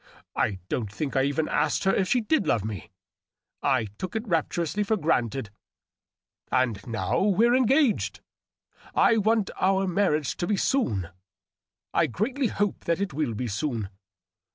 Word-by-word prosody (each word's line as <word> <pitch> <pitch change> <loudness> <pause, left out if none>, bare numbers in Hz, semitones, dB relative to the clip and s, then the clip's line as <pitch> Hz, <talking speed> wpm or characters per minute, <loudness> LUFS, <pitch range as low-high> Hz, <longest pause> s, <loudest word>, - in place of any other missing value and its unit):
I 100 - 0
don't 110 -3 -2
think 140 +6 -4
I 135 - +4
even 145 +3 0
asked - - 0
her 195 - +3
if 190 - +1
she 250 - +2
did 220 +1 +1
love 110 -3 +1
me; 105 -6 -6 0.7
I 130 -5 +2
tooK 185 +5 -5
it 220 +1 -3
rapturously 170 +2 0
for 215 +1 +1
granted... 130 - 0 1.0
And 125 -6 +1
now 115 -2 -1
we're 210 +5 +4
engaged. 260 0 +2 0.8
I 230 - +5
want 215 -1 +2
our 190 +1 +2
marriage 170 -6 +1
to 175 - -2
be 210 - +1
soon; 110 - 0 0.8
I - - +3
Seatly 245 - -1
hope 205 -1 -2
that 170 +1 +1
it 200 -5 -2
will 140 -6 -1
be 125 +3 -3
soon. 110 -1 -2
170 Hz, 155 wpm, -26 LUFS, -, 1.0 s, I